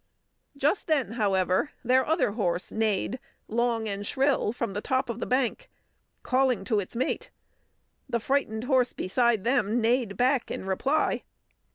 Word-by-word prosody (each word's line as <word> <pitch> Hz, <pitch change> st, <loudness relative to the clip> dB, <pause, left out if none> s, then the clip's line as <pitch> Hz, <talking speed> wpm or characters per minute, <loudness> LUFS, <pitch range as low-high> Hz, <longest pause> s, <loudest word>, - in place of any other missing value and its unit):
Just 290 Hz, +8 st, +1 dB
then, 285 Hz, -9 st, +1 dB
however, 195 Hz, -, +1 dB
their 255 Hz, +2 st, +4 dB
other 320 Hz, -, +1 dB
horse 185 Hz, -5 st, -1 dB
neighed 220 Hz, +3 st, 0 dB, 0.3 s
long 230 Hz, 0 st, 0 dB
and 200 Hz, -1 st, -3 dB
shrill 265 Hz, 0 st, +1 dB
from 235 Hz, -3 st, -3 dB
the 205 Hz, -, -3 dB
top 260 Hz, 0 st, 0 dB
of 230 Hz, -, -7 dB
the -, -, -3 dB
bank, 260 Hz, -, 0 dB, 0.5 s
calling 255 Hz, -5 st, +2 dB
to 215 Hz, +1 st, +1 dB
its 200 Hz, +3 st, -6 dB
mate. 255 Hz, -, -2 dB, 0.8 s
The 235 Hz, -, 0 dB
frightened 230 Hz, -3 st, -1 dB
horse 255 Hz, -1 st, +2 dB
beside 235 Hz, +1 st, +1 dB
them 240 Hz, -2 st, +1 dB
neighed 230 Hz, -2 st, +1 dB
back 255 Hz, 0 st, +2 dB
in -, -, -5 dB
reply. 270 Hz, +11 st, +1 dB
235 Hz, 150 wpm, -27 LUFS, 210-260 Hz, 0.8 s, their